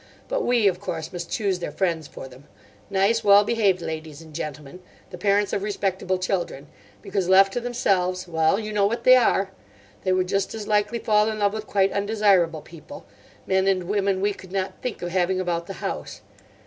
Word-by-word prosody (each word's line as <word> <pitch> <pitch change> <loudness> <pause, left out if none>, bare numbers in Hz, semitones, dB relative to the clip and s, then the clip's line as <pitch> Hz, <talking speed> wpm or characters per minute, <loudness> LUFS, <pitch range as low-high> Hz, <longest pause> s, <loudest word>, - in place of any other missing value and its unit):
But - - -1
we, 240 -4 +3
of 180 -2 +1
course, 160 -5 -5
must 175 -1 -6
choose 195 -4 -1
their 175 - -4
friends 165 -2 -1
for - - -9
them—nice, 190 - -3
well 205 0 +7
behaved 205 -5 +1
ladies 155 -2 -6
and 160 -1 -14
gentlemen, 150 +2 -7 0.3
the 180 - -7
parents 200 +1 +1
of 200 - 0
respectable 190 -2 -1
children; 180 -6 -3 0.4
because 190 -3 -2
left 195 +1 +6
to - - -1
themselves—well, 185 -7 0
you 215 -1 -5
know 200 -1 +3
what 235 +2 -3
they 255 +1 +8
are! 200 -6 +2 0.5
They 185 - +1
would 185 0 +1
just 195 +3 -1
as 210 -2 -6
likely 210 +2 +1
fall 215 -2 +2
in 215 - -3
love 205 -1 +1
with 215 0 -5
quite 195 -1 +2
undesirable 200 -6 +2
people—men 190 - -5
and 190 -2 +2
women 195 0 0
we 205 +1 +1
could 185 -2 -13
not 195 0 -3
think 245 -7 -5
of 175 - -2
having 185 +1 +1
about 170 -2 -2
the 195 - -6
house. - - -5
195 Hz, 185 wpm, -24 LUFS, 180-210 Hz, 0.5 s, they